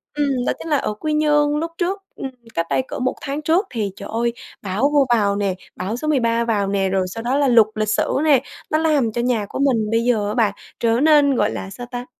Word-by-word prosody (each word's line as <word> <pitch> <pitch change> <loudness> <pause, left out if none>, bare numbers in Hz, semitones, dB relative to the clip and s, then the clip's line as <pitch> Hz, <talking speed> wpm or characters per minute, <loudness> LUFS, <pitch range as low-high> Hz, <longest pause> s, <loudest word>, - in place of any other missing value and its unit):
ừm, 275 -4 0
đó - - +2
chính - - -7
là 295 - +3
ở 215 - -2
Quy 305 +9 -3
Nhơn. 295 -1 +2
Lúc 330 +1 -3
trước, 380 +3 -1
ừm, 270 - -5 0.2
cách 165 - -1
đây - - +2
cỡ - - -5
1 255 0 0
tháng 280 +2 -4
trước 340 +6 +1
thì, 210 -5 -2
trời 200 - -9
ơi, 235 +1 0 0.3
bão 210 +9 0
vô 285 -2 +5
vào 200 -3 +1
nè, 200 -2 0 0.2
bão 200 +6 -3
số 305 - -4
13 235 -5 +1
vào 205 -4 0
nè, 195 -1 0
rồi 190 -1 +1
sau 225 +5 -6
đó 260 +4 0
là 285 - +3
lụt 235 -3 +6
lịch 215 -1 -1
sử 215 - +1
nè, 285 -5 +4 0.3
nó 310 - +3
làm 300 -8 +2
cho 235 - -2
nhà 235 -4 0
của - - -5
mình 235 -6 +2
bây 225 - +2
giờ 220 -4 +1
á 210 - -2
bạn 215 -4 +2 0.3
trở 230 +1 +2
nên, 290 -2 +5
gọi - - +1
là 195 - -5
sao 245 +5 -8
ta, 245 0 -5
245 Hz, 255 wpm, -20 LUFS, 215-290 Hz, 0.3 s, lụt